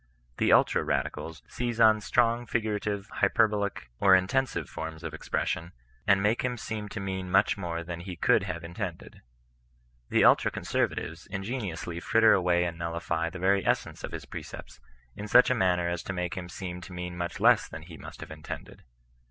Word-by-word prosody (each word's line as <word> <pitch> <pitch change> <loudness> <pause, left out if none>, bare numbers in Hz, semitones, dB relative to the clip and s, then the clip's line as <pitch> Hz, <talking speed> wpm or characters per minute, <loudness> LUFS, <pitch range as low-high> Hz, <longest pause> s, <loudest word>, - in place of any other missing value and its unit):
The - - +2
ultra - - +4
radicals 80 -1 -3
seize 120 -2 -3
on 110 -1 +6
strong 120 +2 +1
figurative, 105 -3 -2
hyperbolic, 100 - +1
or 95 -1 +7
intensive 110 +9 0
forms 80 0 -7
of - - -5
expression, 85 +2 -2 0.3
and 100 -1 +4
make 110 +3 +2
him 125 -1 -2
seem 110 -2 -5
to 110 - -5
mean 95 -1 -4
miuih 95 +3 +4
more 85 -3 -4
than 85 0 -6
he 90 +1 -7
could 85 - +3
have 85 +1 -5
intended. 85 0 -6 0.9
The - - +3
tdtra - - +5
conservatives 80 +1 -2
ingeniously 95 -4 -4
fritter 115 +5 +5
away 90 -1 +3
and 85 -1 -3
nullify 85 0 -2
the 95 - -8
venr 95 +2 +3
essence - - -1
of - - -5
his - - -6
precepts, - - -9 0.4
in 105 - -6
such 125 +4 +6
a - - +5
manner 90 -6 +2
as 85 0 -2
to 95 - -5
make 90 0 -2
him 90 -2 -6
seem 90 0 -6
to 90 - -10
mean 90 0 -5
much 85 0 -4
less - - +5
than - - -9
he 85 0 -11
mtcst - - -11
have - - -8
intended. 75 -1 -8
95 Hz, 180 wpm, -28 LUFS, 85-105 Hz, 0.9 s, or